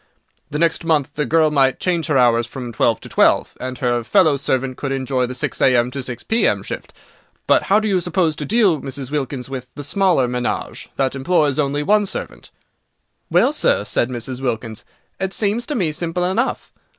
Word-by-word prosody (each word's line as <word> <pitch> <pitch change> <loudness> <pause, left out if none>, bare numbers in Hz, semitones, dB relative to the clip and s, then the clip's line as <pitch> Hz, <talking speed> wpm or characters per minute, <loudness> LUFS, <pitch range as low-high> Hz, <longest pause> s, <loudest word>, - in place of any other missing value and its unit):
The 150 - -3
next 165 +1 +1
month 155 -5 +1
the 150 -2 -2
girl 155 +2 +3
might 135 -3 +2
change 170 -3 0
her 145 -4 +2
hours 120 -2 +3
from 125 -1 -7
twelve 115 +1 +1
to - - -8
twelve, - - +2
and 130 0 -5
her 120 -3 0
fellow 160 - +4
servant 130 -1 -1
could 135 +1 -4
enjoy 130 -1 0
the 125 - -5
six 125 - -3
a.m. 125 -1 +3
to 140 +1 -4
six 125 -2 -6
p.m. 225 +1 +1
shift. - - -7 0.5
But - - +4
how 200 +2 +5
do 215 - -2
you 190 -3 +1
propose 175 -2 0
to 150 - -3
deal, 200 - +2
Mrs. 135 0 -6
Wilkins, 135 -3 -3
with 130 -2 -6
the 145 - -6
smaller 170 -3 +2
menage, 125 0 -3
that 135 -1 0
employs 145 0 +1
only 145 0 0
one 210 +4 +3
servant?" - - -6 0.8
"Well, - - +3
sir," - - +2
said 120 - 0
Mrs. 125 +1 -5
Wilkins, 115 -2 -3 0.3
"it 190 0 -2
seems 220 +3 0
to 295 - -2
me 175 -8 0
simple 170 +3 -3
enough. 220 +8 -1
140 Hz, 195 wpm, -20 LUFS, 125-175 Hz, 0.8 s, how